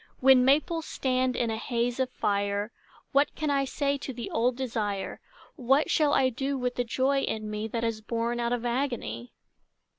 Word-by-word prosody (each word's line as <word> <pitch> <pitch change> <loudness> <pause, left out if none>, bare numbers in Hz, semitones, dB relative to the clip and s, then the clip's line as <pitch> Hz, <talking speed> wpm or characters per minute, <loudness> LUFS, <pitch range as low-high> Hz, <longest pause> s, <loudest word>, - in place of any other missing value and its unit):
When 260 -1 +6
maples 310 +5 +2
stand 255 -1 0
in 235 -2 0
a 220 - -2
haze 240 +2 -1
of 260 -1 +1
fire 205 -1 -1 0.4
What 280 +1 +2
can 305 -2 -1
I 275 -1 +2
say 280 +1 -1
to 270 - -5
the 240 -2 -6
old 240 +2 +1
desire, 220 -6 -3 0.4
What 270 +2 +2
shall 300 -2 +3
I 260 - +4
do 270 +3 -2
with 250 -1 -1
the 245 - -1
joy 265 +3 +1
in 215 -3 -3
me 210 +1 -3
That 230 +1 -3
is 225 -1 -1
born 235 +2 -2
out 235 0 0
of 245 -1 -1
agony? 235 - -3
245 Hz, 185 wpm, -28 LUFS, 225-270 Hz, 0.4 s, When